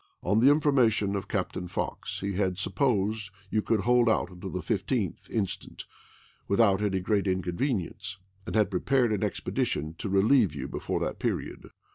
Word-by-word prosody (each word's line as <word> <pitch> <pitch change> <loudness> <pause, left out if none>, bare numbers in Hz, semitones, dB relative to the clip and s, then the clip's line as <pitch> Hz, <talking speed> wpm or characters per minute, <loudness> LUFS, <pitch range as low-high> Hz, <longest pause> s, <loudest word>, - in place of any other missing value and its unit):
On 105 - +2
the 130 +4 +6
information 125 -9 +3
of 100 - -3
Captain 90 - -2
Fox 90 - -4
he 100 0 -2
had 95 -1 0
supposed 105 -2 0 0.2
you 110 - +2
could 110 -1 +1
hold 120 +2 +4
out 90 -4 -1
till 95 - -5
the 90 0 -4
15th 105 - -2
inst. 100 -4 -4 0.6
without 100 -1 +3
any 100 -2 +1
great 100 +1 0
inconvenience; 95 - -2 0.3
and - - -4
had 105 -2 +3
prepared 120 +4 +2
an 100 - -1
expedition 80 +2 -2
to 105 - -3
relieve 100 - +4
you 70 - -4
before - - -3
that - - -3
period. - - -3
100 Hz, 160 wpm, -28 LUFS, 95-115 Hz, 0.6 s, the